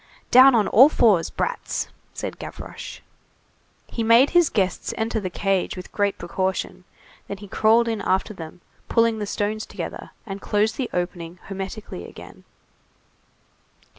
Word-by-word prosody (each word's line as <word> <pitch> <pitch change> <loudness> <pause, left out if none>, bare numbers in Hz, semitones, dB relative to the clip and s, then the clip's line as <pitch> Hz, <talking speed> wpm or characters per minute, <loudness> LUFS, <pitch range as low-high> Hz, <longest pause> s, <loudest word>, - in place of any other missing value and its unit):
"Down 260 +1 +8
on 215 -3 +3
all 260 +7 +7
fours, 210 - +3
brats!" - - -3 0.2
said - - -6
Gavroche. - - -8 0.8
He 230 - -5
made 230 +5 +5
his 350 -3 +4
guests 190 -5 -1
enter 225 0 -1
the 190 -3 -4
cage 195 0 -1
with 180 - -9
great 205 -1 0
precaution, 185 +1 -3 0.4
then 200 - -5
he 205 +1 -11
crawled 225 +4 +3
in 225 -2 -2
after 190 +3 0
them, 165 -1 -10 0.3
pulled 230 -1 +2
the 205 - -3
stones 210 +2 -2
together, - - -7 0.2
and 195 -2 -7
closed 210 +2 +1
the 255 -3 -2
opening 175 -1 -4
hermetically 195 - -7
again. - - -13
205 Hz, 140 wpm, -23 LUFS, 185-230 Hz, 0.8 s, Down